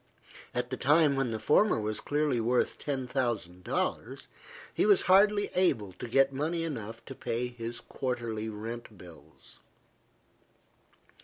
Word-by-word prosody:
At 125 +1 -2
the 130 - -2
time 145 +2 +4
when 135 -2 0
the 110 - -2
former 150 - +3
was 110 0 -2
clearly 145 -4 0
worth 120 +2 +1
ten 135 -3 -3
thousand 115 -9 -2
dollars, - - -3 0.4
he - - +1
was 205 -2 +5
hardly 205 +2 +4
able 125 - +1
to 125 - -7
get 135 +3 +3
money 160 +5 -1
enough 115 -7 -6
to - - -7
pay 120 -1 -2
his 120 -1 -6
quarterly 115 -4 -4
rent 110 0 -7
bills. 90 -3 -15
125 Hz, 140 wpm, -30 LUFS, 115-145 Hz, 0.4 s, was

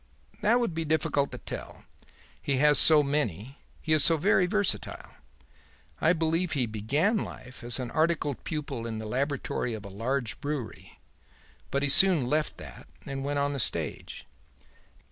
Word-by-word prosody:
"That 235 +4 +3
would 235 -8 -1
be 165 0 -2
difficult 145 -2 0
to - - -7
tell; - - -9 0.6
he 140 -2 -1
has 150 +1 +6
so 155 -2 +7
many; 135 - -3 0.2
he 155 - +1
is 155 -2 +4
so 165 - +5
very 185 +2 +2
versatile. 205 0 -1 0.9
I 160 - +3
believe 165 +1 0
he 135 -5 +1
began 130 - 0
life 130 -9 -8
as 120 0 0
an 125 -2 -5
articled 155 -4 0
pupil 140 -7 -5
in 110 -1 -5
the 110 - -6
laboratory 130 -1 -2
of 105 -1 -9
a - - -8
large 115 +4 -3
brewery, 145 -7 -6 0.7
but 140 +1 -1
he 145 - +1
soon 175 -2 +6
left 150 +4 -1
that - - -12 0.2
and 135 -1 -5
went 145 +1 -2
on 145 0 0
the 140 - -4
stage. - - -4
145 Hz, 165 wpm, -27 LUFS, 125-160 Hz, 0.9 s, so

